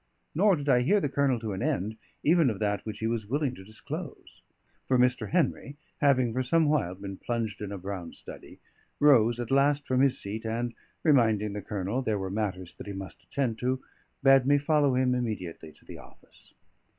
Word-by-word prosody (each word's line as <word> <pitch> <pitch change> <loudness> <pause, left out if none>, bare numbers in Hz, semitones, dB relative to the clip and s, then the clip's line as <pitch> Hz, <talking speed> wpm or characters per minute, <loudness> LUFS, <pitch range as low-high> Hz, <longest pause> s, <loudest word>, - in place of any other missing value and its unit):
Nor 195 +4 +4
did 145 -2 -6
I 125 -3 +4
hear 205 +12 +3
the 145 - -1
Colonel 135 -2 +1
to 110 -3 -3
an 95 - -4
end 105 +5 -1 0.3
even 160 -2 +4
of 110 - -3
that 105 -1 -1
which 105 -2 -5
he 110 - -4
was 115 -2 -2
willing 140 +2 0
to 95 - -11
disclose; 110 +3 -8 0.5
for 130 - +3
Mr. 125 0 +2
Henry, 145 -4 0 0.2
having 130 -5 +3
for 130 - 0
some 160 +5 +2
while 145 - +1
been 100 0 -7
plunged 115 -3 -3
in 105 -1 -5
a 100 - -4
brown 95 -2 -6
study, - - -11 0.4
rose 120 -5 +5
at 120 0 -4
last 140 +1 +3
from 130 0 +1
his 135 -1 +3
seat 105 +3 -5
and 115 +1 -2 0.3
(reminding 110 -9 +3
the 105 - -4
Colonel 105 +4 -2
there 110 -5 -1
were 95 -1 -4
matters 95 -4 -3
that - - -9
he 100 - -5
must 95 -2 -8
attend 125 -5 -2
to) 130 +1 0 0.4
bade 135 -1 +6
me 145 0 +5
follow 145 -2 +2
him 130 0 +2
immediately 105 -10 -4
to - - -21
the - - -10
office. - - -17
120 Hz, 200 wpm, -28 LUFS, 105-140 Hz, 0.5 s, bade